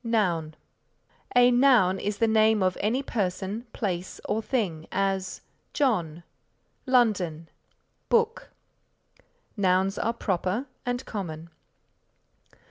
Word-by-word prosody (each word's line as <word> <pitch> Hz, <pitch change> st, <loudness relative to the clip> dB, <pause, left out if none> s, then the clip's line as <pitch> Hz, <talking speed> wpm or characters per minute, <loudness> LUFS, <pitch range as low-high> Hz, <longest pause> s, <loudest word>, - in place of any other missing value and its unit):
NOUN 175 Hz, -9 st, 0 dB, 0.8 s
A 245 Hz, 0 st, +6 dB
noun 240 Hz, -8 st, +4 dB
is 205 Hz, +2 st, -2 dB
the 230 Hz, -, +2 dB
name 220 Hz, -2 st, +4 dB
of 185 Hz, -1 st, +1 dB
any 240 Hz, +7 st, 0 dB
person, 205 Hz, 0 st, -3 dB
place 185 Hz, -5 st, -4 dB
or 220 Hz, -, 0 dB
thing 205 Hz, -9 st, -2 dB
as 195 Hz, -1 st, -1 dB, 0.3 s
John, 175 Hz, -, 0 dB, 0.6 s
London, 190 Hz, -11 st, +1 dB, 0.6 s
book. 465 Hz, -1 st, +1 dB, 1.1 s
Nouns 190 Hz, -1 st, +1 dB
are 230 Hz, -, 0 dB
proper 195 Hz, +2 st, -1 dB, 0.2 s
and 245 Hz, +1 st, -2 dB
common. 170 Hz, -5 st, -6 dB
205 Hz, 100 wpm, -26 LUFS, 180-235 Hz, 1.1 s, A